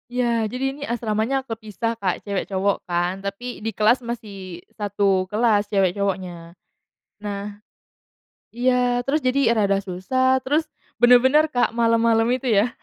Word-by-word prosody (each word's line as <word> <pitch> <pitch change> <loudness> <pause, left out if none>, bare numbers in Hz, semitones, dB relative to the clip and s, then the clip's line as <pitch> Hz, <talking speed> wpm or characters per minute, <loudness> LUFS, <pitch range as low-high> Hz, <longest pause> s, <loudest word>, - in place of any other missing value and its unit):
Iya, 235 -2 0
jadi 250 +4 -5
ini 285 - -13
asramanya 235 +3 -1
kepisah, 225 -1 -4
Kak, 185 -4 -2
cewek 200 -2 -3
cowok 195 +1 0
kan. 175 +2 -1
Tapi 200 +5 -6
di 225 - -2
kelas 225 +4 +3
masih 200 -7 -7
1 200 -2 0
kelas 210 -1 +1
cewek 195 -3 +2
cowoknya. 180 -4 -4 0.7
Nah 205 0 -6 0.9
iya, 245 0 +1
terus 300 +3 0
jadi 255 -2 +2
rada 200 -3 +2
susah. 260 +8 0
Terus, 295 +5 0 0.3
bener-bener, 250 +5 +6
Kak, 245 -1 +2
malam-malam 230 -1 +3
itu 255 0 -2
ya, 220 +2 +2
225 Hz, 135 wpm, -22 LUFS, 200-245 Hz, 0.9 s, bener-bener